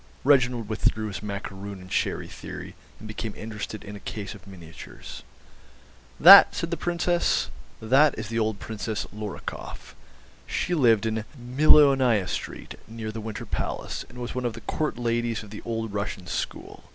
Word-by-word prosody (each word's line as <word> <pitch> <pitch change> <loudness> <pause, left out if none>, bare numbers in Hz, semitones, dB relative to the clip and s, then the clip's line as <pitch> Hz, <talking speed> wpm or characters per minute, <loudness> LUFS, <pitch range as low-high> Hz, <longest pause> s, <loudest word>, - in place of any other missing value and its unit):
Reginald 125 -5 +3
withdrew 110 0 0
his 95 -2 -6
macaroon 100 -1 -6
and 90 0 -13
sherry - - -1
theory, - - -8 0.2
and 110 - -10
became 110 0 -5
interested 110 -1 -6
in 105 0 -8
a - - -8
case 105 0 -6
of 100 -1 -15
miniatures. 85 -6 -11 1.0
"That?" - - +10
said 165 - -3
the - - +1
Princess; 175 +1 0 0.3
"that 135 +6 +4
is 110 -1 -4
the 115 +1 -2
old 110 -2 -1
Princess 110 -1 -4
Lorikoff. 105 -2 -7 0.5
She 180 - -1
lived 115 -9 +4
in 110 -1 -1
Millionaya 130 -4 +5
Street, - - -6
near 110 -1 -6
the 110 +1 -6
Winter 110 -1 -6
Palace, - - -4
and - - -14
was 120 -1 -5
one 125 - -3
of 120 - -1
the - - -9
Court 155 -5 -2
ladies 120 -1 -1
of 105 - -13
the 105 - -8
old 115 -2 -3
Russian 100 -2 -4
school. - - -5
110 Hz, 165 wpm, -26 LUFS, 105-125 Hz, 1.0 s, That